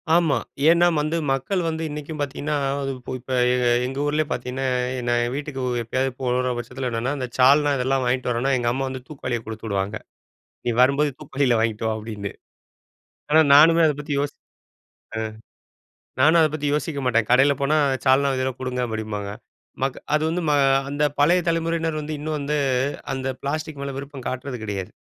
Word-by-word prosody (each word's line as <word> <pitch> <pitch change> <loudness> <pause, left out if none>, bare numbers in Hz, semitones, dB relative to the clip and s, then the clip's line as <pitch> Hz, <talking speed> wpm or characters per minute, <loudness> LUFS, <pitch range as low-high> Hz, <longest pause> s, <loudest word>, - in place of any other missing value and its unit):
ஆமா. 170 -4 +3 0.3
ஏன்னா 170 +1 +5
வந்து 155 +3 -1
மக்கள் 155 +8 0
வந்து, 160 0 -3
இன்னைக்கும் 150 +1 -6
பாத்தீங்கன்னா, 145 +2 -2 0.6
இப்ப 125 +2 -10 0.2
எ - - +2 0.3
எங்க 135 +1 -5
ஊர்லயே 150 +1 0
பாத்தீங்கன்னா, 125 +2 -3 0.4
நான் 120 0 +2
என் 120 +1 -2
வீட்டுக்கு 145 -2 -4 0.2
எப்பயாவது 130 +3 -1
போற 125 0 0
பட்சத்துல 125 +1 -4
என்னென்னா, 115 +3 -1
இந்த 130 -2 -3
சால்னா 145 +3 +5
இதெல்லாம் 130 +1 +1
வாங்கிட்டு 125 0 0
வரேன்னா, 120 +3 0
எங்க 120 -1 0
அம்மா 135 +2 -1
வந்து 130 -1 -6
தூக்குவாளிய 130 -5 -3
குடுத்து 110 0 -7
விடுவாங்க. 100 0 -1 0.7
"நீ - - +2
வரும்போது 140 +3 +3
தூக்குவாளில 135 -5 +1
வாங்கிட்டு 110 -1 -1
வா" 110 - 0
அப்படின்னு. 105 -2 -6 1.0
ஆனா 155 +1 +6
நானுமே 165 +3 +7
அத 150 - +2
பத்தி 150 0 -5
யோசி 145 0 -3 0.8
ஆ. - - -1 1.0
நானும் 155 +5 +6
அத 155 - +5
பத்தி 150 -1 -2
யோசிக்க 150 0 -2
மாட்டேன். 115 -3 +2
கடையில 135 +3 +5
போனா, 140 +2 +2 0.3
சால்னா 135 +1 +4
இதுல்ல 130 0 0
குடுங்க 130 -1 -2
அப்படிம்பாங்க. 110 -2 -4 0.5
மக் 135 -1 -1 0.2
அது 150 - +1
வந்து 175 +2 -1
ம - - +3 0.4
அந்த 145 +1 -1 0.2
பழைய 170 +5 +4
தலைமுறையினர் 165 -1 -1
வந்து, 155 +1 -4
இன்னும் 155 +1 -3
வந்து, 145 +1 -1 0.6
அந்த 135 0 -3
பிளாஸ்டிக் 155 +1 -3
மேல 140 -1 -4
விருப்பம் 140 -2 -8
காட்றது 130 +1 -4
கிடையாது. 100 -2 -4
135 Hz, 165 wpm, -23 LUFS, 125-150 Hz, 1.0 s, நானுமே